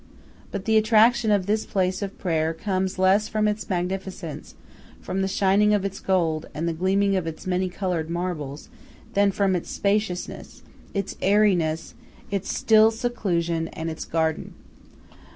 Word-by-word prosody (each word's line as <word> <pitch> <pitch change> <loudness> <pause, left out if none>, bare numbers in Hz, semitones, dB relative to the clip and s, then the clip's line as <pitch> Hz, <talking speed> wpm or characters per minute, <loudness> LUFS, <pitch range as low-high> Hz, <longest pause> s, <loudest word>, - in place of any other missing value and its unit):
But 200 -1 -5
the 220 -1 +4
attraction 225 +1 +4
of 200 -3 +2
this 215 +2 +1
place 185 -1 -1
of 200 -1 -5
prayer 160 -2 0
comes 185 +1 -2
less 190 +3 +3
from 215 -1 0
its 210 0 -2
magnificence, 185 -3 -4 0.4
from 195 - -3
the 190 - +1
shining 200 +2 +3
of 200 -1 -1
its 195 0 -4
gold, 165 -4 0
and 160 +3 -2
the 170 - 0
gleaming 195 +4 +1
of 180 -3 -1
its 160 -1 -7
many 185 0 0
colored 180 -4 -2
marbles, 165 -5 -4 0.5
than 200 0 +4
from 195 -1 +1
its 175 - -4
spaciousness, 200 -3 -2 0.3
its 200 -1 -2
airiness, 185 -6 +2 0.4
its 200 -1 -2
still 220 0 +5
seclusion, 175 -8 -1
and 165 0 -5
its 160 - -6
garden. 160 -1 -2
190 Hz, 150 wpm, -24 LUFS, 170-205 Hz, 0.5 s, still